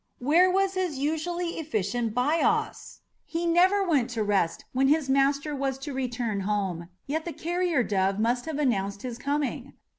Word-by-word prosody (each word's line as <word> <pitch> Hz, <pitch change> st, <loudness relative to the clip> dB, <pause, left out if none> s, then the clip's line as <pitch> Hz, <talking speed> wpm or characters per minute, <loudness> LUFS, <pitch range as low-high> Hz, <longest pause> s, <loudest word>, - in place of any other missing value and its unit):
Where 325 Hz, +8 st, +4 dB
was 385 Hz, +1 st, +1 dB
his 365 Hz, -6 st, -2 dB
usually 335 Hz, +5 st, -2 dB
efficient 225 Hz, -, -2 dB
Bias? 290 Hz, +7 st, 0 dB, 0.2 s
He 335 Hz, +1 st, -3 dB
never 370 Hz, +4 st, +3 dB
went 275 Hz, -7 st, +2 dB
to 220 Hz, -, +1 dB
rest 195 Hz, -5 st, 0 dB
when 265 Hz, +1 st, +3 dB
his 290 Hz, -1 st, +2 dB
master 280 Hz, +2 st, +2 dB
was 270 Hz, -1 st, -2 dB
to 275 Hz, +1 st, -6 dB
return 245 Hz, -5 st, -2 dB
home, 190 Hz, -4 st, -2 dB, 0.2 s
yet 315 Hz, +3 st, -2 dB
the 340 Hz, -, -5 dB
carrier 345 Hz, -5 st, 0 dB
dove 195 Hz, -2 st, 0 dB
must 240 Hz, +5 st, 0 dB
have 315 Hz, -3 st, -3 dB
announced 200 Hz, -8 st, -1 dB
his 240 Hz, -2 st, -5 dB
coming! 285 Hz, +1 st, -2 dB
275 Hz, 160 wpm, -27 LUFS, 230-325 Hz, 0.2 s, Where